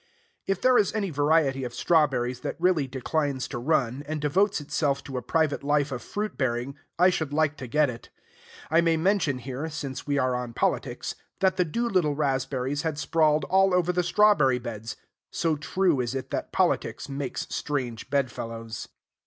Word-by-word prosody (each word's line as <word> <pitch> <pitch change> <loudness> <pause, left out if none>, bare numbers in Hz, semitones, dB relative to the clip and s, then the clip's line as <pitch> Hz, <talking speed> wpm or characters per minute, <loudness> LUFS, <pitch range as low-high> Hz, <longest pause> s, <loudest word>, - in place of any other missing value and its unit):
If 195 - 0
there 255 -1 +5
is 200 - +2
any 200 -4 -1
variety 145 -2 +2
of 120 -1 -5
strawberries 130 -6 +2
that - - -4
really 170 -5 +2
declines 135 +1 -2
to - - -4
run, 130 -1 0
and 155 0 -3
devotes 190 +8 +2
itself 140 -1 -1
to 135 - -8
a 125 - -1
private 155 +2 0
life 145 0 +1
of 125 -2 -4
fruit 210 +1 -4
bearing, 130 +1 -1 0.2
I 180 +2 +5
should 160 -5 -2
like 155 0 +1
to 130 - -7
get 150 +4 +3
it. 120 -3 -8 0.6
I 165 +1 +5
may 165 -1 +2
mention 165 -5 +1
here, 130 +5 -5
since 140 -4 -6
we 145 0 +1
are 130 -2 +1
on 125 -1 -3
politics, - - -1 0.3
that 190 -1 +2
the 180 - +3
Doolittle 185 -5 0
raspberries 135 -1 -1
had 160 -3 -2
sprawled 155 +1 +2
all 190 0 +3
over 180 0 +2
the 180 - +2
strawberry 175 -8 +4
bed's: 115 -1 -6 0.3
so 165 -2 0
true 170 +1 +1
is 125 +2 -3
it 135 - -5
that - - -3
politics - - 0
makes 140 -2 -4
strange 130 -6 -3
bedfellows. 115 -5 -3
145 Hz, 180 wpm, -26 LUFS, 130-165 Hz, 0.6 s, there